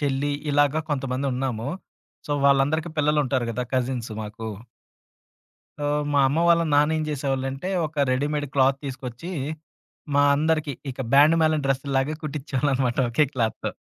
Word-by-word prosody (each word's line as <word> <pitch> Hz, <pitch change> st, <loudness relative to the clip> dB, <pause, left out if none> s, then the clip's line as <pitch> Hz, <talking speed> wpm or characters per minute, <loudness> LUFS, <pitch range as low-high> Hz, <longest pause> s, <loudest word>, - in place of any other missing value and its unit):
చెల్లి 145 Hz, 0 st, 0 dB, 0.2 s
ఇలాగ 145 Hz, +2 st, +2 dB
కొంతమంది 135 Hz, -1 st, -1 dB
ఉన్నాము. 125 Hz, -1 st, -2 dB, 0.6 s
సో, -, -, 0 dB
వాళ్ళందరికి 145 Hz, +4 st, +2 dB
పిల్లలుంటారు 145 Hz, -4 st, +1 dB
కదా! 125 Hz, +2 st, -2 dB
కజిన్స్ 125 Hz, -2 st, -1 dB
మాకు. 105 Hz, +1 st, -7 dB, 1.3 s
సో, 145 Hz, -, -2 dB, 0.3 s
మా 140 Hz, -, +4 dB
అమ్మ 145 Hz, +5 st, 0 dB
వాళ్ళ 170 Hz, 0 st, +5 dB
నాన్న 150 Hz, +2 st, +4 dB
ఏం 155 Hz, -, -1 dB
చేసేవాళ్ళంటే, 135 Hz, +2 st, -2 dB, 0.2 s
ఒక 150 Hz, -2 st, 0 dB
రెడీమేడ్ 145 Hz, +3 st, -1 dB
క్లాత్ 135 Hz, 0 st, +4 dB
తీసుకొచ్చి, 130 Hz, +5 st, -6 dB, 0.8 s
మా 145 Hz, -, +5 dB
అందరికి 155 Hz, 0 st, +1 dB, 0.2 s
ఇక 130 Hz, -, -14 dB
బ్యాండ్ 150 Hz, +4 st, +6 dB
మాలెం 155 Hz, -2 st, +2 dB
డ్రెస్సులాగా 135 Hz, +2 st, 0 dB
కుట్టించేవాళ్ళనమాట 135 Hz, -3 st, -1 dB
ఒకే 150 Hz, +6 st, +3 dB
క్లాత్‌‌తో. 115 Hz, -4 st, -1 dB
140 Hz, 130 wpm, -24 LUFS, 130-150 Hz, 1.3 s, బ్యాండ్